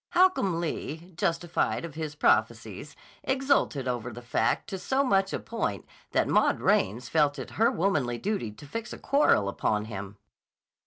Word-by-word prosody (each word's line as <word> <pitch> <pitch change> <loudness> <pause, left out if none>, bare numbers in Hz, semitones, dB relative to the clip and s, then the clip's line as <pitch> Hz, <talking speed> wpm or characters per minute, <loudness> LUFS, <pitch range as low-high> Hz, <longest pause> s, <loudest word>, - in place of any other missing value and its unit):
Holcomb 350 - +3
Lee, 170 +1 -5
justified 170 0 0
of 165 - -8
his 155 -1 -5
prophecies, - - 0 0.3
exulted 265 - +1
over 125 -1 -2
the 120 +2 -10
fact 120 - 0
to 190 - -3
such 195 -4 +1
a - - -1
point 160 - -3 0.2
that - - +1
Maud - - +3
Raines 120 +6 +1
felt 150 -3 +2
it - - -7
her 230 +2 +3
womanly 145 -10 0
duty 195 - -2
to 105 - -13
fix 225 +10 -5
a - - -7
quarrel 275 - +3
upon 105 +1 0
him. 100 -1 -7
160 Hz, 155 wpm, -28 LUFS, 120-200 Hz, 0.3 s, Holcomb